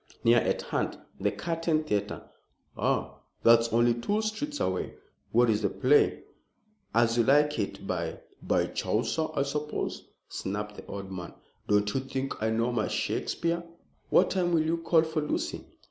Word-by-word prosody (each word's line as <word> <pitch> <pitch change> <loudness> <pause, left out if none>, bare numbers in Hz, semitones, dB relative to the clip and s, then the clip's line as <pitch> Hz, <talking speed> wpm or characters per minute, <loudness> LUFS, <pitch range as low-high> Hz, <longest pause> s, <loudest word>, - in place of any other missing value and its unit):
"Near 120 +1 +6
at - - -1
hand. - - -2 0.2
The - - +1
Curtain 165 -2 -1
Theatre." 105 -8 -2 0.5
"Ah! - - -1 0.2
That's 115 0 +6
only 120 +1 +4
two 205 - -1
streets 290 +8 -3
away. 95 -1 -1 0.4
What 120 +2 +4
is 110 -1 +2
the 100 - +1
play?" 135 +8 +3 0.7
"As 115 0 +3
You - - +5
Like 145 +2 +4
It, 100 -1 -3
by 85 -3 -3
" - - -32
"By - - +4
Chaucer, 160 -1 -1
I 140 - +2
suppose," 150 +2 -3 0.2
snapped 105 +2 -4
the - - -10
old 100 -1 -6
man. 90 -2 -7 0.3
"Don't 105 0 +2
you - - +1
think 135 -1 -4
I 110 - +1
know 115 +2 +1
my 115 -3 0
Shakespeare? 170 0 -1 0.5
What - - +4
time 175 -2 +1
will 160 -2 +4
you 165 +1 +1
call 165 -1 +3
for 160 -1 -2
Lucy?" 150 - -3
120 Hz, 165 wpm, -28 LUFS, 105-160 Hz, 0.7 s, Near